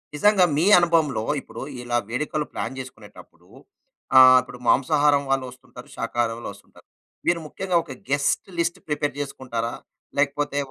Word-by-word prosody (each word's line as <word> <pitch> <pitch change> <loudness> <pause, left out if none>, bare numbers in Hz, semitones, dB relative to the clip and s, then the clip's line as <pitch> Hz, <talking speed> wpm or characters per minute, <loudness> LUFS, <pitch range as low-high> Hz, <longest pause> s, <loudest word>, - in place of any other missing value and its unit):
నిజంగా 195 +2 +4
మీ 165 - +2
అనుభవంలో 160 -10 +1 0.2
ఇప్పుడు, - - -10 0.2
ఇలా 120 0 -1
వేడుకలు 150 +4 -2
ప్లాన్ - - -4
జేసుకునేటప్పుడూ, 115 -5 -13 0.7
ఆహ్, 130 0 +9
ఇప్పుడు 125 -1 -12
మాంసాహారం 145 +1 +3
వాళ్ళొస్తుంటారు, 130 -2 -4
శాకాహారం 115 -1 -1
వాళ్ళోస్తుంటారు. 100 -3 -12 0.4
మీరు 175 -1 +2
ముఖ్యంగా 185 +1 -1
ఒక 135 - -11 0.2
గెస్ట్ 140 0 0
లిస్ట్ 170 +1 -1
ప్రిపేర్ 145 -2 -1
జేసుకుంటారా, 125 -4 -4 0.5
లేకపోతే 145 0 0
140 Hz, 125 wpm, -23 LUFS, 125-150 Hz, 0.7 s, ఆహ్